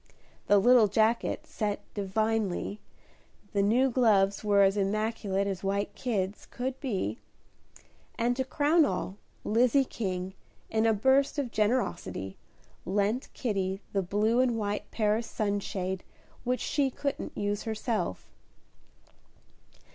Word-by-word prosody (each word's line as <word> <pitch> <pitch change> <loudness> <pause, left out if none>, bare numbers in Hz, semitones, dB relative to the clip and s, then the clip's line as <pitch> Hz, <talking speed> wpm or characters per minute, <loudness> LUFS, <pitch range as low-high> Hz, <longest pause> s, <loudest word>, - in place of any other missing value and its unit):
The 205 - +6
little 235 +2 +6
jacket 220 +3 +1
set 205 -1 -2
"divinely," 210 0 -1 0.7
the 200 - +2
new 245 +6 +3
gloves 205 -6 +3
were 200 -1 +4
as 195 0 +4
immaculate 205 -1 0
as 195 -1 -3
white 200 +1 -1
kids 205 -5 -2
could 260 +1 -4
be, 235 -4 -2 1.0
and 240 +1 +1
to 260 - 0
crown 295 +5 +3
all, 190 -4 -2 0.3
Lizzie 250 +5 +3
King, 185 -5 -4 0.4
in 220 0 +2
a 225 - +4
burst 265 +7 +3
of 270 -5 -2
generosity, 210 - -1 0.5
lent 205 - 0
Kitty 195 -5 -1
the 195 - +2
blue 210 +6 +1
and 250 -3 +2
white 205 -1 -3
Paris 220 +1 0
sunshade 195 -3 -2 0.4
which 250 -1 -1
she 280 -2 +1
couldn't 280 +2 -4
use 205 0 -1
herself. 220 - -3
215 Hz, 120 wpm, -29 LUFS, 200-245 Hz, 1.0 s, The